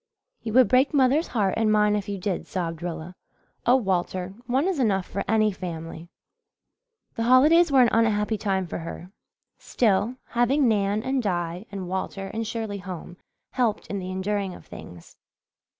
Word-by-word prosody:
"You 220 - -5
would 255 -1 +6
break 260 +6 +3
mother's 275 +4 +3
heart 200 -5 0
and 220 -1 +2
mine 210 0 +3
if 205 -1 -3
you 200 - -3
did," 190 -1 -3
sobbed 165 -3 -4
Rilla. 170 0 -5 0.5
"Oh, 245 - +6
Walter, 185 -4 -1
one 265 +7 +1
is 375 -6 -1
enough 195 -7 +1
for 200 - -4
any 215 0 +3
family." 165 -2 -7 1.0
The - - -4
holidays 295 +8 +5
were 265 -2 +6
an 240 - +4
unhappy 220 -1 +1
time 190 -2 0
for 170 - -5
her. 170 +2 -8 0.5
Still, 225 +1 +1
having 250 +3 +2
Nan 205 -1 +1
and 265 0 0
Di 175 -1 -3
and 195 -3 -5
Walter 190 +1 -4
and 225 0 -3
Shirley 220 -3 -4
home 180 -1 -8 0.3
helped 235 -5 0
in 200 - -2
the 185 0 -6
enduring 190 0 -2
of - - -14
things. 85 -1 -12
205 Hz, 165 wpm, -25 LUFS, 185-240 Hz, 1.0 s, would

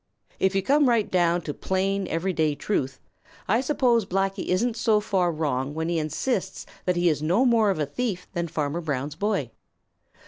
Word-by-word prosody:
If 190 0 +2
you 195 - +1
come 285 +3 +4
right 230 -3 +2
down 175 -1 +2
to 150 -2 -5
plain, 195 +3 -1
everyday 165 -3 0
truth, 135 -5 -2 0.5
I 225 +5 +3
suppose 250 -4 +2
Blacky 195 +1 -1
isn't 225 +6 +1
so 225 -2 +2
far 190 -4 +1
wrong 145 -3 -2
when 160 +1 -2
he 170 -1 +1
insists 190 - -2 0.2
that 180 - +1
he 175 0 +2
is 155 -3 +1
no 180 +12 +2
more 230 -4 +4
of 195 - 0
a 150 - 0
thief 185 - -3
than 170 -2 -2
Farmer 155 +1 -2
Brown's 145 -2 -3
boy. 185 - -1
185 Hz, 180 wpm, -25 LUFS, 155-210 Hz, 0.5 s, come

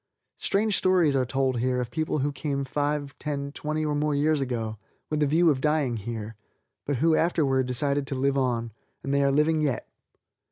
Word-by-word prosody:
Strange 210 +1 +1
stories 180 -6 +3
are 130 -2 +1
told 130 -1 0
here 125 +1 0
of 125 -1 -3
people 155 -1 -1
who 145 +1 0
came 140 -1 -2
five, 145 +1 -2
ten, 140 -2 -3
twenty 155 +1 -3
or 150 - 0
more 150 0 0
years 150 +1 +2
ago, 115 -5 -3 0.3
with 155 0 0
a 150 - +3
view 165 +3 +4
of 130 -2 -2
dying 150 -5 +1
here, 110 0 -5 0.5
but 145 - +1
who 160 +5 +3
afterward 140 -7 +2
decided 140 +2 0
to 135 - -3
live 135 +1 +1
on, 120 -4 0 0.3
and 135 - -2
they 140 0 +3
are 140 - +3
living 155 +2 +2
yet. 140 -6 -1
140 Hz, 195 wpm, -26 LUFS, 130-150 Hz, 0.5 s, view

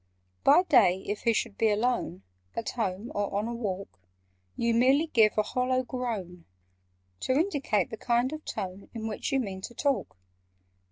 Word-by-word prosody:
"By 360 - +6
day, 190 - +4
if 205 +1 -4
he 230 - +5
should 200 - -2
be 225 - +4
alone— 210 - 0 0.3
At 230 - -3
home 215 -1 -3
or 205 -1 -1
on 210 +2 -1
a 235 - -3
walk— 200 - -5 0.6
You 235 0 +1
merely 265 +6 +4
give 225 -10 +3
a 215 - +4
hollow 255 +2 0
groan, 215 -9 -5 0.7
To 260 - 0
indicate 285 - +1
the 225 - -5
kind 240 +5 +1
of 310 0 -7
tone 190 +1 -6
In 220 -1 -4
which 220 -1 -3
you 270 - +2
mean 195 -6 -4
to 240 - -8
talk. 280 - -1
230 Hz, 170 wpm, -28 LUFS, 200-255 Hz, 0.7 s, By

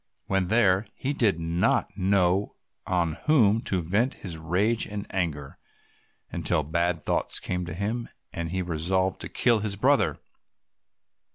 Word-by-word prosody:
When 95 -2 0
there 100 -1 +3
he 140 +2 -2
did 105 - +2
not 85 +1 0
know 95 0 +1 0.3
on 85 -4 0
whom 115 -8 +4
to 90 -3 -1
vent 105 +10 +1
his 90 -5 -7
rage 95 +8 0
and 105 -1 -5
anger, 75 -7 -3 0.7
until 75 - 0
bad 85 +2 -1
thoughts - - 0
came 90 -1 -3
to 85 - -5
him, 110 +5 -3 0.2
and 85 -1 -3
he 95 +2 -2
resolved 90 +3 0
to - - -4
kill 120 -3 +2
his 105 -1 -2
brother. 100 - +2
95 Hz, 145 wpm, -26 LUFS, 85-105 Hz, 0.7 s, whom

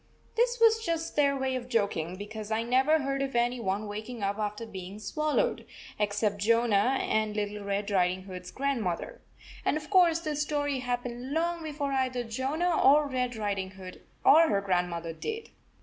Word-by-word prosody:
This 485 +1 +1
was 450 -1 +5
just 330 -4 -2
their 280 -1 +3
way 265 -1 -1
of 250 -1 -5
joking, 200 -7 0
because 210 +2 -7
I 220 +1 0
never 265 +6 +3
heard 275 0 -1
of 270 -2 -2
any 240 +1 +1
one 205 0 -2
waking 215 +2 -6
up 200 +2 -1
after 210 +1 -3
being 190 -2 -8
swallowed, 305 - 0 0.4
except 205 0 0
Jonah 230 +2 +3
and 215 -1 0
Little 210 -1 -3
Red 200 +1 -2
Riding 185 -1 +1
Hood 185 -1 -7
s 180 - -10
grandmother. 265 - -2 0.4
And - - +1
of 310 +4 -9
course, 350 -4 +5
this 300 -3 -2
story 290 -2 -1
happened 245 +1 -3
long 340 +1 0
before 295 -3 -3
either 260 -2 0
Jonah 275 +9 0
or 290 +2 +6
Red 250 -2 -1
Riding 200 -3 -2
Hood 185 -1 -10 0.2
or 325 +2 +7
her 200 - +2
grandmother 175 -3 -1
did. 445 - -5
245 Hz, 175 wpm, -29 LUFS, 205-290 Hz, 0.4 s, or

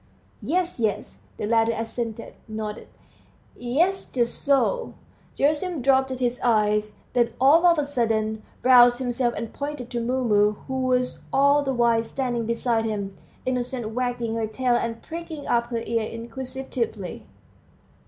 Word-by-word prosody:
"Yes, 360 -3 -1
yes," 215 -3 -1 0.2
the - - -3
latter 225 +1 +3
assented, 230 0 -4
nodding; 215 -1 -5 0.7
"yes, 335 +11 +1
just 240 -2 -2
so." 285 - +1 0.4
Gerasim 305 +1 0
dropped 265 0 +4
his 245 -1 -1
eyes, 210 -2 +2 0.2
then 240 -2 +2
all 310 +7 +6
of 340 -1 +5
a 295 - +2
sudden 220 -5 0 0.2
roused 245 -1 +7
himself 245 -1 -1
and 230 - -5
pointed 285 -4 -5
to 240 - -1
Mumu, 230 -4 +2
who 265 -1 -2
was 250 0 0
all 280 +2 +4
the 270 -1 -1
while 235 -2 +3
standing 240 -1 -2
beside 230 -1 0
him, 200 -3 -3 0.3
innocently 250 -2 -2
wagging 245 -1 -2
her 225 -1 -1
tail 245 +3 0
and 230 -1 -1
pricking 325 -3 -7
up 235 0 +1
her 230 -1 -3
ears 230 -2 -1
inquisitively. 235 -4 -5
240 Hz, 140 wpm, -24 LUFS, 225-265 Hz, 0.7 s, roused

